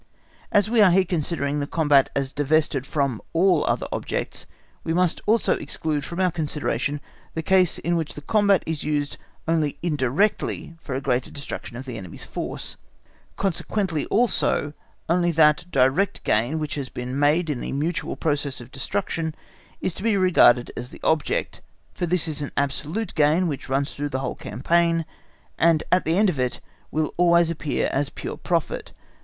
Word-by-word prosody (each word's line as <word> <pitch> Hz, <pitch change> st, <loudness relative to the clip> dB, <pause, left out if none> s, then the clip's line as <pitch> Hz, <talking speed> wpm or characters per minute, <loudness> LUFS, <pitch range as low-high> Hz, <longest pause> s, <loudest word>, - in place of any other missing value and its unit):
As 205 Hz, -1 st, +4 dB
we 225 Hz, 0 st, +3 dB
are 200 Hz, -, +8 dB
here 185 Hz, +2 st, +4 dB
considering 150 Hz, -4 st, -1 dB
the 145 Hz, -, -2 dB
combat 145 Hz, -4 st, +3 dB
as 135 Hz, -1 st, -1 dB
divested 145 Hz, -2 st, +1 dB
of 135 Hz, -6 st, +1 dB
all 175 Hz, -1 st, +4 dB
(other) -, -, 0 dB
objects, -, -, -3 dB, 0.4 s
we 165 Hz, -, -1 dB
must 180 Hz, -1 st, +1 dB
also 220 Hz, +1 st, +3 dB
exclude 150 Hz, 0 st, -3 dB
from 170 Hz, -, -5 dB
our 185 Hz, -1 st, +3 dB
consideration 150 Hz, -2 st, -2 dB, 0.4 s
the 160 Hz, -, -2 dB
case 185 Hz, 0 st, +3 dB
in 170 Hz, 0 st, -1 dB
which 160 Hz, -3 st, -2 dB
the 150 Hz, -, -8 dB
combat 200 Hz, 0 st, +3 dB
is 160 Hz, -2 st, -3 dB
used 145 Hz, -1 st, -1 dB, 0.3 s
only 160 Hz, -3 st, +1 dB
indirectly 155 Hz, -, 0 dB
for 135 Hz, -, -5 dB
a 135 Hz, -, -2 dB
greater 125 Hz, -1 st, 0 dB
destruction 140 Hz, -4 st, -7 dB
of 130 Hz, -, -7 dB
the 120 Hz, -4 st, -6 dB
enemy's 90 Hz, -3 st, -8 dB
force; -, -, -5 dB, 0.6 s
consequently 190 Hz, -3 st, -1 dB
also, 200 Hz, -9 st, +1 dB, 0.3 s
only 175 Hz, +1 st, +2 dB
that 155 Hz, +1 st, +4 dB
direct 140 Hz, +8 st, +2 dB
gain 120 Hz, +9 st, +1 dB
which 155 Hz, -2 st, -3 dB
has 140 Hz, -3 st, -4 dB
been 125 Hz, +2 st, -4 dB
made 150 Hz, +4 st, +3 dB
in 145 Hz, -5 st, -2 dB
the -, -, -3 dB
mutual 155 Hz, +5 st, -2 dB
process 145 Hz, -3 st, -1 dB
of 120 Hz, +1 st, -11 dB
destruction, 160 Hz, +1 st, -2 dB, 0.5 s
is 185 Hz, -, -1 dB
to -, -, -7 dB
be 220 Hz, -1 st, +2 dB
regarded 165 Hz, -10 st, +5 dB
as 120 Hz, +1 st, -5 dB
the -, -, -12 dB
object, 160 Hz, -2 st, 0 dB, 0.3 s
for 175 Hz, -, -2 dB
this 175 Hz, -1 st, +1 dB
is 155 Hz, -1 st, -2 dB
an 145 Hz, -, -4 dB
absolute 150 Hz, +9 st, -1 dB
gain, 155 Hz, +4 st, +3 dB
which 145 Hz, -5 st, -4 dB
runs 140 Hz, +1 st, 0 dB
through 145 Hz, +1 st, -3 dB
the 130 Hz, -, -2 dB
whole -, -, -2 dB
campaign, 165 Hz, +7 st, +1 dB, 0.5 s
and 165 Hz, -2 st, +4 dB
at 180 Hz, -, +3 dB
the 165 Hz, +3 st, +2 dB
end 210 Hz, +1 st, +5 dB
of 165 Hz, -8 st, -1 dB
it 125 Hz, -1 st, -1 dB, 0.3 s
will 155 Hz, -1 st, -1 dB
always 170 Hz, -1 st, +4 dB
appear 150 Hz, -3 st, -1 dB
as 140 Hz, +1 st, 0 dB
pure -, -, -6 dB
profit. 170 Hz, -3 st, -2 dB
155 Hz, 175 wpm, -24 LUFS, 140-175 Hz, 0.6 s, are